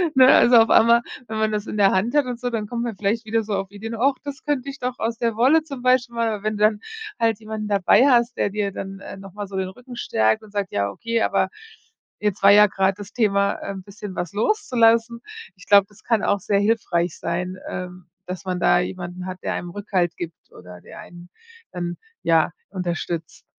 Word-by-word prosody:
ne, 260 Hz, -1 st, +7 dB
also, 245 Hz, -2 st, +7 dB
auf 225 Hz, 0 st, +5 dB
einmal, 235 Hz, +1 st, +6 dB, 0.3 s
wenn 220 Hz, 0 st, -4 dB
man 220 Hz, 0 st, +1 dB
das 210 Hz, 0 st, -2 dB
in 215 Hz, -, -5 dB
der 195 Hz, -1 st, +5 dB
Hand 200 Hz, +6 st, 0 dB
hat 295 Hz, -2 st, +3 dB
und 245 Hz, -2 st, -5 dB
so, 245 Hz, 0 st, -3 dB
dann 220 Hz, -3 st, -3 dB
kommt 235 Hz, +1 st, -3 dB
man 230 Hz, -4 st, -4 dB
vielleicht 215 Hz, +4 st, -1 dB
wieder 225 Hz, +1 st, 0 dB
so 210 Hz, -, -4 dB
auf 195 Hz, 0 st, -4 dB
Ideen: 225 Hz, +3 st, -6 dB
„Ach, 275 Hz, +3 st, +3 dB
das 285 Hz, -1 st, -7 dB
könnte 280 Hz, -2 st, -1 dB
ich 275 Hz, -, -7 dB
doch 250 Hz, 0 st, -4 dB
aus 225 Hz, +1 st, -2 dB
der 230 Hz, -2 st, -1 dB
Wolle 275 Hz, +7 st, +4 dB
zum 275 Hz, -5 st, -8 dB
Beispiel 255 Hz, -1 st, +2 dB
machen.“ 230 Hz, -1 st, +1 dB
Aber 205 Hz, -1 st, -6 dB
wenn 215 Hz, -1 st, -1 dB
dann 210 Hz, 0 st, +2 dB, 0.4 s
halt 225 Hz, -2 st, +1 dB
jemanden 215 Hz, -1 st, -5 dB
dabei 200 Hz, +5 st, +4 dB
hast, 240 Hz, -2 st, +3 dB
der 205 Hz, -, 0 dB
dir 205 Hz, -1 st, -2 dB
dann, 195 Hz, 0 st, -7 dB
ähm, 195 Hz, -, -9 dB
noch 195 Hz, -2 st, -12 dB
mal 205 Hz, -1 st, -6 dB
so 195 Hz, -, -9 dB
den 190 Hz, -1 st, -2 dB
Rücken 250 Hz, +4 st, -12 dB
stärkt 110 Hz, -, +1 dB
und 210 Hz, -, -15 dB
sagt: 200 Hz, -2 st, -3 dB
„Ja 100 Hz, 0 st, -1 dB
okay, 230 Hz, -, -1 dB
aber -, -, +1 dB, 0.7 s
jetzt 210 Hz, -2 st, -1 dB
war 200 Hz, -, +8 dB
ja 210 Hz, +1 st, +8 dB
grad 195 Hz, 0 st, 0 dB
das 205 Hz, 0 st, -10 dB
Thema, 200 Hz, -3 st, +2 dB
äh, -, -, -6 dB
'n 190 Hz, -1 st, -8 dB
bisschen 200 Hz, -1 st, -9 dB
was 175 Hz, +1 st, -4 dB
loszulassen.“ 235 Hz, -, +2 dB, 0.3 s
Ich 185 Hz, -, -16 dB
glaube, 200 Hz, -1 st, +6 dB
das 205 Hz, -, -20 dB
kann 225 Hz, -3 st, +1 dB
auch 200 Hz, -, +1 dB
sehr 200 Hz, +1 st, +1 dB
hilfreich 185 Hz, -6 st, 0 dB
sein, 180 Hz, +2 st, -3 dB
ähm, 180 Hz, -1 st, -7 dB, 0.2 s
dass 180 Hz, -1 st, -6 dB
man 180 Hz, -1 st, -2 dB
da 175 Hz, -, +4 dB
jemanden 180 Hz, 0 st, -5 dB
hat, 185 Hz, 0 st, -5 dB
der -, -, -1 dB
einem 175 Hz, -, -5 dB
Rückhalt 190 Hz, -4 st, -1 dB
gibt 165 Hz, -2 st, -8 dB
oder 90 Hz, 0 st, -13 dB
der -, -, -13 dB
einen 175 Hz, 0 st, -13 dB, 0.4 s
dann, 175 Hz, -1 st, -4 dB, 0.3 s
ja, 165 Hz, 0 st, +3 dB, 0.2 s
unterstützt. 175 Hz, -3 st, -4 dB
205 Hz, 225 wpm, -22 LUFS, 185-230 Hz, 0.7 s, war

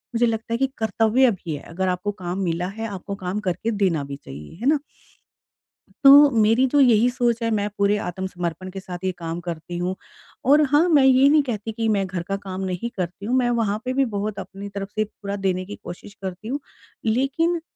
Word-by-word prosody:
मुझे 235 Hz, +1 st, +4 dB
लगता 230 Hz, 0 st, -2 dB
है -, -, +1 dB
कि 270 Hz, +2 st, +2 dB
कर्तव्य 225 Hz, +3 st, +3 dB
भी 170 Hz, -6 st, -5 dB
है, 145 Hz, -, -8 dB
अगर 185 Hz, +3 st, -2 dB
आपको 180 Hz, +3 st, -1 dB
काम 185 Hz, -2 st, -5 dB
मिला 175 Hz, 0 st, -1 dB
है, 225 Hz, +4 st, -5 dB
आपको 200 Hz, -1 st, -6 dB
काम 190 Hz, +1 st, -3 dB
करके 210 Hz, +3 st, -2 dB
देना 190 Hz, -8 st, +1 dB
भी 140 Hz, 0 st, -6 dB
चाहिए। 75 Hz, -, -11 dB
है 250 Hz, -, 0 dB
ना? 300 Hz, -1 st, +3 dB, 1.3 s
तो 285 Hz, +1 st, +9 dB
मेरी 225 Hz, +2 st, +4 dB
तो 290 Hz, -, +5 dB
यही 240 Hz, -3 st, +5 dB
सोच 240 Hz, -2 st, 0 dB
है, 230 Hz, -, +1 dB
मैं 205 Hz, -2 st, 0 dB
पूरे 200 Hz, +1 st, +3 dB
आत्मसमर्पण 180 Hz, -1 st, -4 dB
के 195 Hz, +1 st, -7 dB
साथ 180 Hz, -2 st, -7 dB
ये 185 Hz, -, +1 dB
काम 165 Hz, 0 st, -4 dB
करती 175 Hz, 0 st, -6 dB
हूँ 180 Hz, +1 st, -1 dB, 0.5 s
और 295 Hz, +2 st, +7 dB
हाँ, 300 Hz, +5 st, +4 dB
मैं 295 Hz, -5 st, +5 dB
ये 265 Hz, +1 st, +6 dB
नहीं 300 Hz, +1 st, +5 dB
कहती 225 Hz, -4 st, -4 dB
कि 225 Hz, +1 st, -1 dB
मैं 195 Hz, -1 st, 0 dB
घर 180 Hz, -2 st, -4 dB
का 195 Hz, -, 0 dB
काम 190 Hz, -1 st, -6 dB
नहीं 185 Hz, +5 st, -3 dB
करती 180 Hz, +2 st, -4 dB
हूँ, 250 Hz, +3 st, +1 dB
मैं 245 Hz, -2 st, +2 dB
वहाँ 220 Hz, -3 st, 0 dB
पे 255 Hz, -, -1 dB
भी 270 Hz, +1 st, +2 dB
बहुत 205 Hz, +1 st, -2 dB
अपनी 200 Hz, +1 st, -7 dB
तरफ़ 200 Hz, -1 st, -5 dB
से 215 Hz, -, +1 dB
पूरा 200 Hz, -1 st, -6 dB
देने 185 Hz, 0 st, 0 dB
की 205 Hz, -, -7 dB
कोशिश 175 Hz, +3 st, -9 dB
करती 190 Hz, +3 st, -6 dB
हूँ। 280 Hz, +4 st, -2 dB, 0.4 s
लेकिन 275 Hz, +9 st, +1 dB
205 Hz, 215 wpm, -23 LUFS, 185-240 Hz, 1.3 s, तो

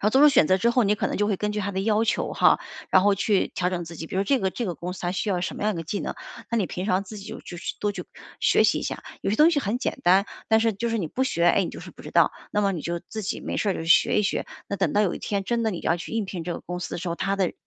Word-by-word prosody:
后 210 Hz, -, +3 dB
做 270 Hz, +5 st, +5 dB
出 300 Hz, -, +9 dB
选 270 Hz, -, +5 dB
择 185 Hz, -, +4 dB
之 230 Hz, +5 st, +2 dB
后， 240 Hz, -2 st, +3 dB
你 205 Hz, -, +3 dB
可 -, -, -1 dB
能 -, -, -3 dB
就 205 Hz, -, +1 dB
会 205 Hz, -2 st, 0 dB
根 210 Hz, +2 st, -1 dB
据 210 Hz, -, -3 dB
他 200 Hz, 0 st, -2 dB
的 190 Hz, -, -1 dB
要 215 Hz, +2 st, +2 dB
求 220 Hz, -, 0 dB
哈， -, -, +4 dB, 0.3 s
然 185 Hz, -, +6 dB
后 205 Hz, 0 st, +4 dB
去 200 Hz, 0 st, +1 dB
调 180 Hz, 0 st, +1 dB
整 175 Hz, -2 st, -3 dB
自 165 Hz, 0 st, -9 dB
己， 160 Hz, -, -6 dB
比 -, -, -8 dB
如 190 Hz, -, +2 dB
这 270 Hz, +7 st, +2 dB
个 190 Hz, -4 st, 0 dB
这 235 Hz, +4 st, -3 dB
个 175 Hz, -, -2 dB
公 180 Hz, +1 st, -5 dB
司 180 Hz, -, -9 dB
它 175 Hz, -, -1 dB
需 190 Hz, +3 st, -2 dB
要 180 Hz, -2 st, 0 dB
什 175 Hz, -, -3 dB
么 -, -, -4 dB
样 215 Hz, -2 st, +1 dB
的 165 Hz, -, -4 dB
技 195 Hz, +5 st, -3 dB
能， -, -, -4 dB, 0.4 s
那 235 Hz, -, +1 dB
你 215 Hz, -, +2 dB
平 180 Hz, +3 st, -4 dB
常 185 Hz, -1 st, +2 dB
自 210 Hz, +2 st, -9 dB
己 200 Hz, -, -10 dB
就 -, -, -7 dB
去 175 Hz, -, -9 dB, 0.2 s
多 205 Hz, -, +1 dB
去 205 Hz, -, -6 dB, 0.3 s
学 -, -, +4 dB
习 -, -, +3 dB
一 -, -, -5 dB
下， -, -, -4 dB, 0.2 s
有 -, -, -1 dB
些 215 Hz, -, 0 dB
东 310 Hz, +3 st, +6 dB
西 305 Hz, -, +1 dB
很 215 Hz, -3 st, -1 dB
简 260 Hz, -, -2 dB
单， 190 Hz, +3 st, +5 dB, 0.2 s
但 220 Hz, 0 st, +5 dB
是 225 Hz, -1 st, +2 dB
就 235 Hz, +4 st, -2 dB
是 230 Hz, -, 0 dB
你 170 Hz, -7 st, -2 dB
不 260 Hz, +9 st, -1 dB
学， 170 Hz, -9 st, 0 dB
哎， 195 Hz, +2 st, +4 dB
你 -, -, -4 dB
就 -, -, -9 dB
是 -, -, -10 dB
不 -, -, -15 dB
知 -, -, -8 dB
道， -, -, +5 dB, 0.2 s
那 210 Hz, -, +2 dB
么 200 Hz, -1 st, +2 dB
你 170 Hz, -5 st, -4 dB
就 170 Hz, 0 st, -3 dB
自 220 Hz, -, -5 dB
己 195 Hz, -, -3 dB
没 -, -, -4 dB
事 205 Hz, -, +1 dB
儿 -, -, 0 dB
就 165 Hz, -, -4 dB
学 165 Hz, -, +4 dB
一 -, -, 0 dB
学。 200 Hz, -, -1 dB, 0.2 s
那 200 Hz, -, -2 dB
等 195 Hz, -, 0 dB
到 205 Hz, -, +3 dB
有 200 Hz, -4 st, +2 dB
一 -, -, -6 dB
天 200 Hz, -1 st, -2 dB
真 235 Hz, +4 st, -1 dB
的 220 Hz, -, +2 dB
你 175 Hz, -, -5 dB
要 170 Hz, -, +1 dB
去 170 Hz, -, -8 dB
应 225 Hz, -2 st, 0 dB
聘 180 Hz, -3 st, -6 dB
这 175 Hz, -, -2 dB
个 -, -, -6 dB
公 180 Hz, 0 st, -5 dB
司 180 Hz, -, -5 dB
的 -, -, -4 dB
时 175 Hz, +1 st, -4 dB
候， 170 Hz, -, -2 dB
它 195 Hz, +2 st, 0 dB
的 190 Hz, -3 st, 0 dB
195 Hz, 385 characters per minute, -25 LUFS, 180-215 Hz, 0.4 s, 出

